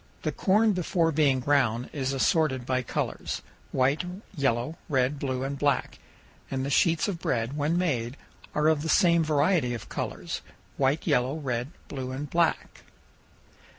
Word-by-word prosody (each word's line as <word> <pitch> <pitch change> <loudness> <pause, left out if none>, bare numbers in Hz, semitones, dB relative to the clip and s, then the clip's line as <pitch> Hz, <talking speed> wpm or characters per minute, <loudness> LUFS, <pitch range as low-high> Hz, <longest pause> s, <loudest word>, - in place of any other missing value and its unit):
The - - 0
corn 210 +2 +3
before 170 -2 +1
being 140 -4 +3
ground 125 -4 +1
is 135 -2 -1
assorted 135 -1 +1
by 130 0 0
colors, 125 - -3 0.3
white, 135 +5 +2 0.3
yellow, 140 +1 0
red, 135 0 +1
blue, 130 -2 -2
and 140 0 -3
black, 145 -3 0 0.5
and 135 0 -2
the 140 - -2
sheets 165 +3 +3
of 190 -5 -3
bread, 115 0 -1
when 150 +3 +1
made, 130 -8 -1 0.4
are 150 +1 +3
of 155 -2 +3
the 160 - -3
same 170 -3 +4
variety 150 -4 +2
of 115 - -9
colors, - - -4 0.3
white, 140 +3 +1
yellow, 125 +3 +2
red, 125 -5 -2 0.2
blue, 130 -2 -5
and 135 +2 -5
black. 170 -1 0
140 Hz, 150 wpm, -27 LUFS, 130-160 Hz, 0.5 s, same